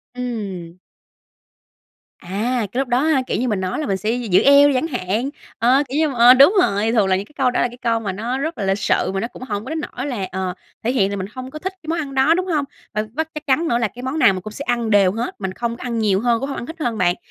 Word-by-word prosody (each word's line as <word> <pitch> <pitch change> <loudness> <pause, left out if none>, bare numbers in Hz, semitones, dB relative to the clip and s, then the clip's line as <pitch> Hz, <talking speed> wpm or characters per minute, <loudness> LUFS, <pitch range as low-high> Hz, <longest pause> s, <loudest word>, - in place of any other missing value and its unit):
Ừm. 200 -9 -5 1.4
À, 220 +6 -2
cái 245 - -2
lúc 270 - 0
đó 245 +1 +2
ha, 305 -3 +2
kiểu - - -1
như, 255 - 0
mình 210 -5 0
nói 185 0 -2
là 310 - -2
mình 195 - 0
sẽ 210 +3 -3
gi 245 -1 -3
giữ 185 -2 +4
eo 280 +1 +7
đi 285 - +2
chẳng 260 +6 0
hạn, 225 - -2 0.3
ờ, 255 +5 +4
kiều 275 - -2
như, 315 -1 +2
mà, 270 - -5
ờ, 240 +1 +9
đúng 280 +10 +6
rồi, 210 - +1
thường 215 -4 +3
là 190 - +3
những 195 +2 -3
cái 300 - -23
câu 255 -2 +2
đó - - 0
là - - +2
cái 245 - -12
câu 230 -2 0
mà 200 -4 -3
nó 230 +7 -3
rất 320 +4 -3
là 205 - -3
lịch 195 +1 +1
sự, 195 - +1
mà 195 - -1
nó 225 - -2
cũng 255 - -11
hổng 205 -3 -4
có - - -7
đến 320 - -2
nỗi 270 -3 -5
là, 215 -9 -3
ờ, 185 -1 -2 0.3
thể 235 - +1
hiện 205 -7 +2
là 200 - -3
mình 190 -1 -4
hông 255 0 -7
có 305 - -7
thích 380 +4 -4
cái 310 - -14
món 330 +1 -1
ăn 280 -3 -5
đó, 265 +5 +4
đúng 365 +2 -1
hông? 305 -5 0 0.3
Và 215 - 0
với 320 +4 -1
chắc 300 0 -6
chắn 300 +5 +2
nữa 235 - +2
là 235 -2 +1
cái 245 +5 -11
món 265 +5 -2
nào 195 - +6
mình 185 - -5
cũng 215 +3 -8
sẽ 280 - -6
ăn 235 -2 0
đều 200 -3 +4
hết, 230 0 -5
mình 190 -1 -3
không 235 +2 -3
có - - -9
ăn 235 -2 -2
nhiều 200 -3 +2
hơn, 235 +1 +1
cũng 275 +3 -4
hông - - -4
ăn - - -5
hít 325 +1 -9
hơn 240 -7 -1
bạn, 175 -2 +2
240 Hz, 310 wpm, -20 LUFS, 205-275 Hz, 1.4 s, ờ